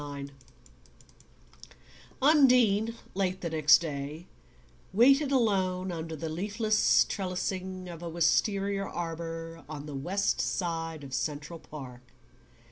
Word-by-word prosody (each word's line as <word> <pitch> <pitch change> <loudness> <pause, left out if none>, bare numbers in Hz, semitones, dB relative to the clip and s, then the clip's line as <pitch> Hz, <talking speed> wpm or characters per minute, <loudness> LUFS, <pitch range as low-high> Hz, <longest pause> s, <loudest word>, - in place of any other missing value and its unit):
IX 140 -1 -7 1.9
Undine, 245 -7 +5 0.2
late 185 -1 -1
the 170 - -3
next 155 0 +6
day, 150 +1 -5 0.7
waited 275 +7 +5
alone 190 -7 +1
under 165 -1 -5
the 160 +2 -5
leafless 205 +6 +2
trellising 185 -1 -3
of 170 -2 -8
a 170 - -5
wistaria 195 +4 +1
arbour 165 -2 -5
on 150 -2 -6
the 150 - -7
west 180 +9 0
side 165 -4 -3
of 135 - -9
the - - -2
Central 150 +2 -4
Park. 130 -6 -10
175 Hz, 115 wpm, -29 LUFS, 160-200 Hz, 1.9 s, next